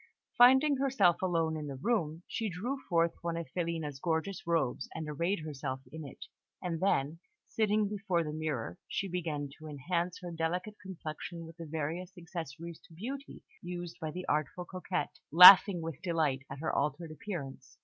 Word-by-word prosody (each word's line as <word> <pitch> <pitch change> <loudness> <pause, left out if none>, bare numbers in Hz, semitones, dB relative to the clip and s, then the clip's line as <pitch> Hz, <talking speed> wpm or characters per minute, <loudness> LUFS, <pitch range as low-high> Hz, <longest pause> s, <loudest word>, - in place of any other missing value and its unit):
Finding 265 +4 +6
herself 255 -11 +3
alone 165 -3 +1
in 150 -1 -5
the 140 - -5
room, 165 - -1
she 225 -2 -2
drew 240 +10 -4
forth 170 -1 +3
one 170 -1 -2
of 170 - -3
Filina's 165 -5 -2
gorgeous 170 +4 -2
robes, 150 -7 0
and 160 -1 -4
arrayed 170 +5 -1
herself 140 -3 -4
in 160 +1 -7
it; 140 - -10 0.3
and 170 -3 -3
then, 160 -4 +1 0.3
sitting 215 -1 +1
before 195 -4 -1
the 150 -1 -5
mirror, 140 - -3
she 200 - -2
began 160 -5 -3
to 155 - -9
enhance 170 +5 -2
her 175 - -5
delicate 175 +5 -2
complexion 170 -2 -7
with 165 +1 -12
the 165 -1 -8
various 165 +5 -4
accessories 170 -1 -7
to 165 - -18
beauty 265 +10 -7 0.2
used 175 -1 -6
by 160 - -3
the 180 +4 -6
artful 155 +4 -1
coquette, 185 -4 -4
laughing 180 +2 +10
with 160 -2 -6
delight 155 -7 0
at 135 +1 -7
her 160 - -1
altered 150 +3 -1
appearance. 155 -5 -7
170 Hz, 170 wpm, -32 LUFS, 155-185 Hz, 0.3 s, laughing